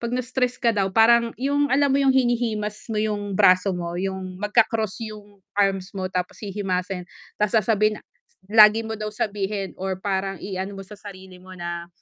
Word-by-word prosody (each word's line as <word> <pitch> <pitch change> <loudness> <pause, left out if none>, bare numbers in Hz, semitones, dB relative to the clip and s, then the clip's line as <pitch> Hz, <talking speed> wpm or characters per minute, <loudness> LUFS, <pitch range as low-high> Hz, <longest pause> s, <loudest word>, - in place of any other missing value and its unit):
'pag 235 0 -3
na-stress 250 0 -1
ka 230 -3 +2
daw, 195 -2 +1
parang 235 +2 +5
yung 285 +2 +1
alam 280 +1 +3
mo 275 - +3
yung 270 -1 +4
hinihimas 235 -5 0
mo 215 - -1
yung 205 -2 -2
braso 185 +2 +5
mo, 175 -2 -4
yung 190 0 -4
magka-cross 215 -1 +1
yung 210 -1 -11 0.2
arms 195 -2 0
mo 185 -1 -3
tapos 180 -1 -3
hihimasin? 190 -3 -3 0.3
Ta's 210 +2 0
sasabihin 215 -1 +2
na - - -25 0.5
lagi 215 +1 +7
mo 220 0 -5
daw 215 0 -3
sabihin 200 -2 -3
or 190 0 -3
parang 195 0 -2
i-ano 195 0 -4
mo 195 - -7
sa 205 +2 -13
sarili 190 -3 -11
mo 185 +1 -13
na, 170 -1 -5
205 Hz, 180 wpm, -23 LUFS, 190-225 Hz, 0.5 s, lagi